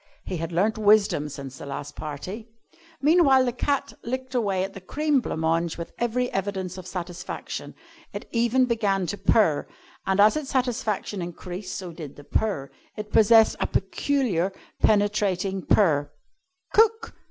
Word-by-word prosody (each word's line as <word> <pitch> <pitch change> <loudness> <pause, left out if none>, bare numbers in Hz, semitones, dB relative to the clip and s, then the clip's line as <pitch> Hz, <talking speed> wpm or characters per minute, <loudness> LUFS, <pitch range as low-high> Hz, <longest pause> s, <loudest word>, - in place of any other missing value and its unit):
He 185 - -3
had 165 +1 -4
learnt 205 +6 +1
wisdom 205 -8 +3
since 135 -2 -8
the - - -8
last 140 +1 -6
party. 185 +10 -6 0.5
Meanwhile, 285 -4 +5
the 245 - 0
cat 280 +3 -1
licked 260 +2 -4
away 200 -6 +1
at 195 +1 -5
the 195 - -9
cream 295 +8 +1
blanc 160 - -4
mange 165 +1 0
with 170 - -7
every 245 +1 0
evidence 190 -2 -2
of 185 - -10
satisfaction. 175 -2 -6 0.4
It - - -7
even 240 +2 +3
began 205 -6 0
to 205 +4 -3
purr, 195 -6 +3 0.4
and 190 +1 +1
as 210 +5 +6
its 305 -3 -3
satisfaction 240 -6 -1
increased 180 +2 -6
so 180 -2 -6
did 155 -4 -9
the 145 - -12
purr. 150 -5 -1 0.3
It 210 0 -6
possessed 225 0 +6
a - - 0
peculiar 220 - 0 0.3
penetrating 200 -3 +1
purr. 145 -8 +3 0.6
"Cook!" 450 +1 +3
205 Hz, 155 wpm, -25 LUFS, 175-240 Hz, 0.6 s, as